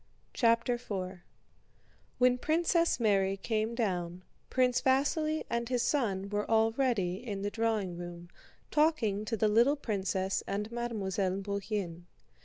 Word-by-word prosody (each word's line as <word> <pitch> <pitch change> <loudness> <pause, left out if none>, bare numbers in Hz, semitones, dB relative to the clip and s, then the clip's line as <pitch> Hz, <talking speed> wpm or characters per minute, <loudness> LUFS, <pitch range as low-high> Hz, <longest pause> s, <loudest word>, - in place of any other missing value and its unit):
CHAPTER 230 0 +3
IV 190 -4 -4 1.0
When 250 0 +4
Princess 335 +2 +2
Mary 195 -3 +2
came 220 +2 -1
down, 180 -6 -2 0.3
Prince 250 -1 +2
Vasíli 305 +4 +1
and 235 0 -2
his 245 -2 +1
son 200 -9 0
were 205 0 -2
already 225 -3 +1
in 200 -5 -4
the 205 - -1
drawing 220 -6 -1
room, 175 0 -8 0.4
talking 280 -10 +2
to 225 +1 -2
the 215 - +3
little 235 +7 +4
princess 195 -6 -1
and 210 +3 -3
Mademoiselle 200 -5 -2
Bourienne. 200 -4 -3
215 Hz, 125 wpm, -31 LUFS, 195-245 Hz, 1.0 s, When